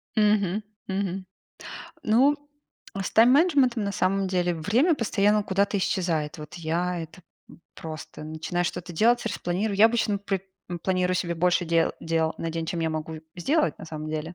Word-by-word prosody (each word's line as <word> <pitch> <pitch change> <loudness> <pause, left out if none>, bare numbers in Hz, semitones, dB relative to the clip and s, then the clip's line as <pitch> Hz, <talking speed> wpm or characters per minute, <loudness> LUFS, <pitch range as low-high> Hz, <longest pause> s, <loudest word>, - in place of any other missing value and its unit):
Мгм. 210 -1 +2 0.2
Мгм. 190 -1 -2 0.8
Ну, 265 +7 +4 0.7
с - - -3
тайм-менеджментом, 255 - +4
на 200 - -2
самом 195 +1 +1
деле, 180 -2 +1
время 235 - +2
постоянно 210 -3 +2
куда-то 200 +1 +1
исчезает. 165 -5 -1
Вот 150 -1 -9
я 170 +1 -1
это 165 +3 -9 0.3
п - - -15 0.2
просто 155 -1 -8
начинаю 160 +3 -2
что-то 180 0 -4
делать, 235 +8 +3
распланирую. 195 +4 -1
Я 215 +2 +8
обычно 220 -3 0
при 195 -2 -2 0.3
м, 175 - -3
планирую 185 0 +1
себе 170 -1 -1
больше 180 +1 +2
дел 165 0 +2
дел 165 -1 0
на 165 - -3
день, 165 0 -3
чем 170 0 -2
я 160 -1 0
могу 155 +1 -4 0.2
в 175 - -9
сделать, 300 - +1
на - - -8
самом 155 -1 -6
деле. 155 +2 -4
185 Hz, 165 wpm, -26 LUFS, 165-210 Hz, 0.8 s, Я